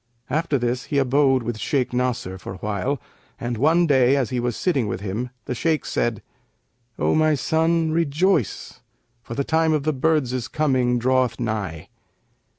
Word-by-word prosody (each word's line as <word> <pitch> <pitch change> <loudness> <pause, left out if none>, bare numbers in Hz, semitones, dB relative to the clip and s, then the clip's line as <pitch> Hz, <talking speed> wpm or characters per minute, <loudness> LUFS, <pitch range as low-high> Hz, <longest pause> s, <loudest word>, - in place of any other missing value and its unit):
After 155 0 +1
this 125 0 -2
he 145 - -2
abode 135 -1 +3
with 115 -1 -4
Shaykh 125 +3 -1
Nasr 125 -7 -2
for 95 - -7
a - - -10
while 105 +8 -2 0.4
and, 120 0 -3
one 160 +8 +3
day 135 -3 +4
as 135 -4 0
he 125 - 0
was 120 -1 -2
sitting 140 - 0
with 100 - -4
him, 105 +5 -3 0.2
the - - -3
Shaykh 155 +5 0
said, 115 -3 -1 0.7
'O - - +1
my 155 -1 +3
son, 160 +3 +1
rejoice 165 - 0 0.4
for 115 - -8
the 140 - 0
time 160 +1 +2
of 150 -2 0
the 155 +1 +1
birds' 130 -4 0
coming 130 -5 +1
draweth 125 -1 +1
nigh.' 105 -9 -3
130 Hz, 165 wpm, -23 LUFS, 120-155 Hz, 0.7 s, day